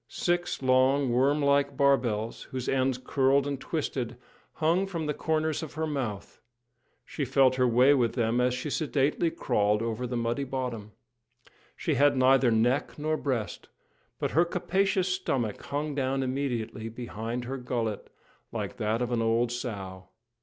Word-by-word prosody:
Six 175 -4 -1
long, 130 +1 +3
worm 140 +4 +2
like 140 -1 +2
barbels, 120 -6 +1
whose 130 -1 -4
ends 130 -1 +1
curled 135 +1 +2
and 140 -2 -3
twisted, 130 -6 -3 0.4
hung 170 +5 +1
from 170 -4 -4
the 150 - -1
corners 155 0 -1
of 155 -3 -8
her 160 0 -1
mouth; 130 -10 -4 0.6
she 150 - -4
felt 135 0 +4
her 125 -1 +3
way 125 +4 +5
with 120 -5 +2
them 120 0 +1
as 125 0 +2
she 135 +4 -4
sedately 150 +2 +1
crawled 105 -7 +1
over 115 +2 -2
the 120 0 -3
muddy 120 +3 -1
bottom. 125 -5 -4 0.8
She - - -1
had 145 -1 +4
neither 130 0 +5
neck 120 +4 +1
nor 155 +1 0
breast, 130 -8 -3 0.5
but - - -2
her 165 - +4
capacious 190 +2 0
stomach 135 - -1
hung 145 +1 -2
down 135 -1 0
immediately 125 -4 -3
behind 115 +1 -5
her 135 +2 -4
gullet, 115 -4 -3 0.4
like - - -4
that 110 +3 0
of 120 - -3
an 120 -1 +1
old 115 +1 +1
sow. 100 -7 -6
130 Hz, 155 wpm, -28 LUFS, 120-145 Hz, 0.8 s, way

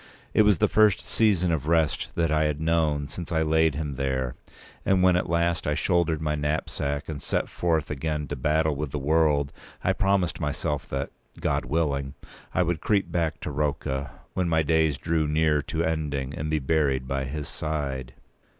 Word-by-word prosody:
It - - +5
was 105 -3 +5
the - - +3
first 105 -2 +4
season 95 -6 +2
of 75 -3 -1
rest 80 -3 +2
that 85 -2 +1
I 80 0 +3
had 75 -1 -1
known 80 -2 +1
p. - - -5
210since 85 +2 -6
I 80 -1 +2
laid 80 -1 +3
him 75 -3 -3
there; 65 -2 -1 0.5
and 95 -1 +3
when 90 -1 +5
at 90 - 0
last 85 -1 +1
I 75 - +1
shouldered 85 -1 +1
my 75 -1 -1
knapsack 75 -1 -2
and 75 -3 -5
set - - -1
forth 80 -4 0
again 75 0 -2
to 75 - -2
battle 75 +3 +1
with 75 0 -3
the 75 - -4
world, 75 -1 +2 0.3
I 95 - +2
promised 95 -3 +1
myself 75 -2 -2
that, 70 +1 -3 0.3
God - - 0
willing, 70 -1 -1 0.4
I 90 - +2
would 85 -2 -1
creep 100 -2 +1
back 85 -3 -1
to - - -4
Rocca, 70 -2 -2 0.2
when 90 -2 0
my 80 -1 +3
days 80 -2 +2
drew 80 +2 0
near 75 0 +2
to 80 +3 -2
ending, 75 -4 -2
and 75 +2 -3
be 80 - +1
buried 70 -3 +1
by 65 0 -1
his 75 +2 -5
side. 70 -5 -4
75 Hz, 190 wpm, -26 LUFS, 70-80 Hz, 0.5 s, It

